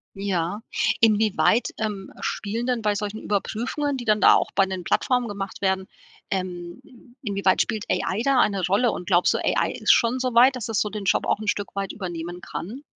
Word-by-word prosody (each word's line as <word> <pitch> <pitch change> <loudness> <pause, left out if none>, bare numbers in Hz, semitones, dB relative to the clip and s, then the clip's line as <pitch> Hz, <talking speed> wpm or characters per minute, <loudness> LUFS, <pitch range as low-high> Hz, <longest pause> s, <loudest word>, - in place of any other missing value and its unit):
Ja. 195 0 -2 0.4
Inwieweit, 220 +1 +3
ähm, 210 -3 -4
spielen 225 +4 -3
dann 250 -3 0
bei 210 -1 +1
solchen 210 +1 -4
Überprüfungen, 240 +8 -2
die 245 - -6
dann 215 -1 +3
da - - +8
auch - - 0
bei 195 - +3
den 190 -2 -5
Plattformen 250 +4 +1
gemacht 200 -1 -6
werden 190 -1 0 0.5
ähm, 175 -2 -5 0.4
inwieweit 200 -4 +2
spielt 215 -2 -2
AI 195 +4 0
da 275 -1 +3
eine 195 -6 +2
Rolle 210 +6 +2
und 180 - -6
glaubst 180 -2 +3
du, - - 0
AI - - +1
ist - - +2
schon 240 0 +3
soweit, 255 +1 +4
dass 235 -2 -5
es 220 -3 0
so 210 - 0
den 210 -1 -6
Job - - +2
auch - - +1
'n 215 - -6
Stück 205 -1 -3
weit 195 -1 -3
übernehmen 175 -2 -6
kann? 240 - -7
205 Hz, 195 wpm, -24 LUFS, 190-230 Hz, 0.5 s, da